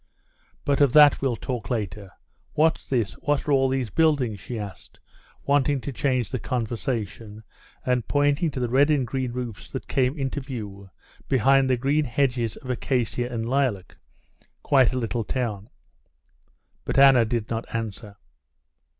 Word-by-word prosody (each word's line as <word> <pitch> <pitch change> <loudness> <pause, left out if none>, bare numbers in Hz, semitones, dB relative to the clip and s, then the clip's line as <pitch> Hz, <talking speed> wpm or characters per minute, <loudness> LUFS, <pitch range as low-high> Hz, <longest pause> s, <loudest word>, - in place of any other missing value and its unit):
"But 140 0 +1
of 140 -4 +4
that 150 -2 +7
we'll 135 -3 0
talk 120 -5 -5
later. 105 -4 -3 0.4
What's 160 +2 +1
this, 115 -5 0
what 145 0 -1
are - - +1
all 135 -1 +3
these 130 -5 -2
buildings?" 145 -10 +2
she 120 +5 -6
asked, 100 -4 -9 0.5
wanting 140 0 +2
to 140 - -5
change 130 -3 0
the 130 - -2
conversation 115 -3 -4 0.4
and 125 -2 0
pointing 145 +3 +2
to 135 - -5
the 125 - 0
red 135 +5 +3
and 145 -4 +2
green 130 +1 -3
roofs 120 -4 -6
that 130 - -6
came 130 +2 0
into 135 +1 -2
view 105 -7 -7 0.4
behind 135 +1 +4
the 130 - +2
green 140 +4 +1
hedges 120 -3 0
of 130 - -6
acacia 125 -1 -1
and 115 -1 -3
lilac. 125 -8 -1 0.7
"Quite 130 -4 +4
a 130 - -3
little 115 -1 -2
town." 110 -4 -3 1.1
But - - -3
Anna 135 -3 +7
did 115 -1 -3
not 115 0 -2
answer. 110 -2 -5
125 Hz, 155 wpm, -25 LUFS, 115-135 Hz, 1.1 s, that